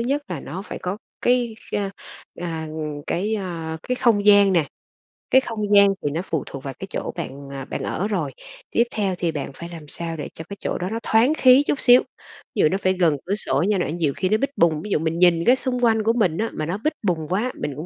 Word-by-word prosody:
nhất 275 +5 0
là 170 -6 -4
nó 185 +7 -6
phải - - -7
có 185 +3 -3 0.2
cái, 245 -2 +2 0.2
a, 200 -1 -1 0.5
à, 165 -2 -4 0.4
cái, 205 +6 -1
a, 170 -5 -4
cái 250 - -1
không 210 -5 +2
gian 205 -2 +7
nè, 165 -5 +2 0.6
cái 260 - +6
không 225 -4 -6 0.2
gian 200 0 +8 0.2
thì 145 - +1
nó 165 +4 -2
phụ 160 -5 -2
thuộc 135 -1 -8
vào 135 - -5
cái 195 - -6
chỗ - - -4
bạn, 140 -4 -6
à, 135 -1 -6
bạn - - -5
ở 195 - -2
rồi. 170 -10 -2 0.4
Tiếp 235 - +4
theo 200 -4 -1
thì 170 -2 0
bạn 145 -2 -4
phải 170 +4 -8
làm 165 -3 -10
sao 165 +2 -5
để 145 - -5
cho 160 - -8
cái 200 - -7
chỗ - - -2
đó 180 +1 -3
nó 225 +2 -3
thoáng 230 +7 +4
khí 260 +2 +7
chút 285 - 0
xíu, 245 0 +7 0.5
ví - - -3
dụ 155 - +5
nó 190 - 0
phải 185 -1 +1
gần 170 -6 +2
cửa 200 +3 0
sổ 210 - 0
nha 210 -2 +2
n 175 -1 -2
nhiều 150 -5 +1
khi 185 - 0
nó 215 - +3
bít 275 +4 0
bùng, 160 -3 +3
ví 210 - -7
dụ 175 - +2
mình 165 +1 -1
nhìn 170 -2 +4
cái 250 +2 +6
xung 250 -2 -2
quanh 220 -1 +3
của 225 +2 +3
mình 190 -9 +1
á 225 +1 -1
mà 155 - -3
nó 175 +5 -2
bít 305 +9 -1
bùng 165 -6 0
quá, 210 +8 0
mình 145 - -3
cũng 155 +4 -6
185 Hz, 260 wpm, -23 LUFS, 160-220 Hz, 0.6 s, gian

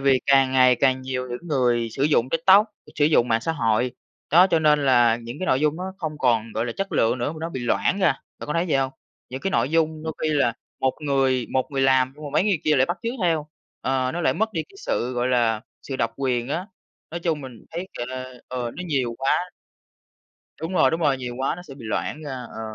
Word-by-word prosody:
vì 135 -1 +3
càng 135 -1 +4
ngày 130 -1 +5
càng 130 -1 +3
nhiều 130 -1 -3
những 125 +8 -6
người 120 -5 +1
sử 135 - -4
dụng 140 -4 +3
TikTok, 190 +6 +5 0.3
sử 145 - +2
dụng 145 -5 +4
mạng 115 0 +2
xã 165 - -1
hội, 120 -3 +1 0.4
đó, 175 +4 +7
cho 165 - +4
nên 150 -2 +3
là 120 -3 +5
những 120 +2 -8
cái 185 - -3
nội 130 - +2
dung 150 0 +1
nó 185 +2 -5
không 155 -4 -4
còn, 115 -4 +1
gọi 115 +2 -1
là, 120 - -3
chất 195 0 -3
lượng 115 +2 +2
nữa, 120 +5 -1
mà - - -10
nó 165 +1 -3
bị 130 - -5
loãng 120 +10 +1
ra, 190 - +3 0.3
bạn - - -7
có 150 - -2
thấy 170 +2 0
vậy 150 - +3
không? 135 -1 0 0.4
Những 130 +1 -6
cái 195 - -1
nội 135 - +1
dung 160 -1 +1
đôi 160 0 -3
khi 155 - +1
là 140 -5 +2 0.3
một 130 - +3
người 135 -4 +1
một 130 +1 0
người 135 -1 -1
làm 130 -1 +3
nhưng 150 +1 -11
mà 145 - -5
mấy - - +3
người 200 -5 +2
kia 155 -1 +3
lại 130 0 +4
bắt 175 - -3
chước 230 +1 -2
theo, 160 -4 +1 0.3
ờ, 130 -1 0
nó 175 - -3
lại - - +2
mất 220 +1 -1
đi 160 - -1
cái - - -18
sự, 125 +2 -1
gọi 125 0 0
là, 115 -3 +2 0.2
sự 135 - -5
độc 115 -2 -1
quyền 125 -3 -1
á. 175 +6 -2 0.4
Nói 170 - -5
chung 165 -3 -1
mình 130 -5 -10
thấy, 175 +3 -5
gọi 120 - -3
là, 130 0 -6 0.2
ờ, 125 -2 -3
nó 180 - -4
nhiều 130 -7 -1
quá. 135 - 0 1.3
Đúng 165 +3 -4
rồi, 185 - +4
đúng 165 +1 -2
rồi, 145 -4 +3
nhiều 125 -1 -5
quá 135 - 0
nó 175 - -9
sẽ 145 -6 -11
bị 130 -4 -12
loãng 130 +7 -3
ra, 145 -3 -6 0.2
ờ, - - -8
135 Hz, 255 wpm, -24 LUFS, 125-160 Hz, 1.3 s, đó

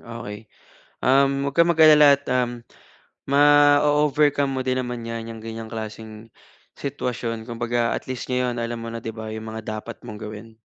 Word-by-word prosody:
okey. 115 -2 -9 0.5
Um, 135 +1 +3
wag - - -19
kang 170 - +6
mag-alala 155 -3 +7
at, 140 - -8
um, 120 -2 -1 0.6
ma-o-overcome 145 0 +4
mo 130 - -1
din 130 0 -1
naman 125 -2 -4
yan, 115 0 -5
yung 115 -1 -9
ganyang 115 0 -7
klaseng 110 0 -8 0.5
sitwasyon 120 -4 -4
kumbaga 120 0 -1
at - - -4
least 130 0 -5
ngayon 125 -1 0
alam 115 0 -4
mo 115 - -6
na 115 - -6
di 115 - -4
ba, 110 0 -8
yung 110 0 -7
mga 110 -1 -5
dapat 115 - -9
mong 110 -1 -8
gawin. 110 +1 -9
120 Hz, 170 wpm, -23 LUFS, 115-140 Hz, 0.6 s, mag-alala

